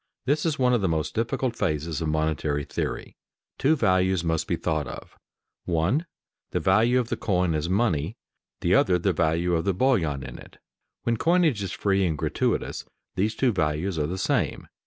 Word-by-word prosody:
This 150 +5 +1
is 155 - 0
one 125 -1 +3
of 120 - +2
the 95 - +1
most 80 -1 -1
difficult 120 +2 -1
phases 80 -4 -1
of 80 - -1
monetary 75 -1 0
theory. - - -4 0.4
Two 155 +4 +4
values 95 - +2
must 80 -1 -1
be - - +1
thought 80 -4 -1
of: 60 - -9 0.5
one 90 - +1 0.4
the - - -1
value 115 +6 +3
of 120 -2 -2
the - - 0
coin 90 -4 0
as 80 +2 -1
money, 95 -2 0 0.4
the - - +2
other 90 -1 +4
the 90 +2 +1
value 85 +2 +1
of 80 -1 +1
the 100 -2 0
bullion 90 - +1
in - - -8
it. - - -14 0.5
When 115 -1 0
coinage 165 - +2
is 95 - -3
free 100 -1 +1
and 80 -3 -1
gratuitous, - - -1 0.3
these 105 +4 0
two 130 -3 +2
values 80 0 -1
are 75 - 0
the 90 +4 -4
same. 95 - -1
95 Hz, 185 wpm, -25 LUFS, 80-115 Hz, 0.5 s, Two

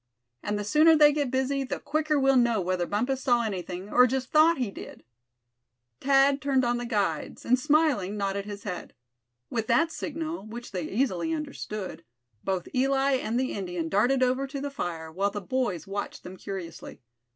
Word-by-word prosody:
And 210 0 -2
the 205 - -3
sooner 310 +9 +5
they 295 -1 +6
get 290 -3 0
busy, 265 +2 0
the 260 - -3
quicker 305 -1 0
we'll 270 0 +4
know 240 -3 +3
whether 180 -1 -1
Bumpus 250 +6 -1
saw 245 -3 +2
anything, 185 -2 -5
or 250 0 +7
just 260 +1 -3
thought 315 +2 +5
he 245 -6 -2
did." - - -10 1.0
Thad 275 +1 +4
turned 270 -3 +2
on 240 0 +1
the 245 - -4
guides, 200 -9 -2
and 250 +1 +3
smiling, 285 - +2
nodded 200 0 -2
his 205 -1 -7
head. 180 -4 -6 0.6
With 225 -2 -2
that 320 +8 +3
signal, 315 -4 -5
which 240 +2 -8
they 180 -4 -3
easily 235 - 0
understood, 215 - -5 0.4
both 190 -2 -2
Eli 270 +1 +2
and 235 -1 -1
the 260 - -1
Indian 180 -4 -3
darted 245 +8 +3
over 255 +2 +1
to 275 +1 -5
the 285 +1 -4
fire; 165 -9 -5
while 195 +5 0
the 205 - -5
boys 205 - -2
watched 200 +1 -5
them 185 - -9
curiously. 190 -3 -7
245 Hz, 180 wpm, -27 LUFS, 195-275 Hz, 1.0 s, or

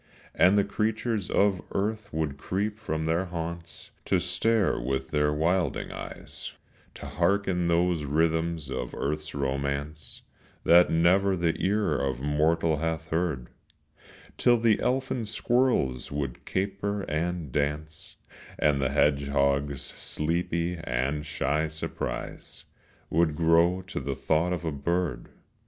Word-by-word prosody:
And 95 +3 +5
the 100 - +5
creatures 110 0 -1
of 100 -2 +2
earth 105 +1 -2
would 75 -3 -2
creep 105 +5 -2
from 80 -7 -2
their 85 +3 +1
haunts 85 -1 -6
To 95 - +2
stare 95 +4 +1
with 65 +1 -2
their 75 -1 +2
wilding 80 +1 0
eyes, - - -7 0.4
To - - -9
hearken 90 0 +1
those 85 -1 +2
rhythms 80 0 0
of 60 -2 -4
earth's 75 +2 -3
romance, 70 +2 -3 0.4
That 85 +1 +6
never 95 +4 +3
the 85 -1 +1
ear 100 -5 +1
of 65 -3 -1
mortal 80 +3 +2
hath 80 +1 -2
heard; 80 -7 -1 0.9
Till 120 0 +5
the 115 -2 +3
elfin 130 -3 -1
squirrels 110 - +1
would 70 -3 -4
caper 100 +1 -2
and 85 -1 -2
dance, 75 +3 -3 0.4
And 75 -2 +2
the 65 - +1
hedgehog's 70 -1 +1
sleepy 85 +2 -2
and 70 +3 -1
shy 75 +1 0
surprise 75 0 -5 0.5
Would 80 -2 +2
grow 85 +3 +3
to 95 - -4
the 70 0 -3
thought 80 +6 +1
of 85 -1 -2
a 80 - 0
bird. 85 +4 -2
80 Hz, 125 wpm, -27 LUFS, 75-95 Hz, 0.9 s, That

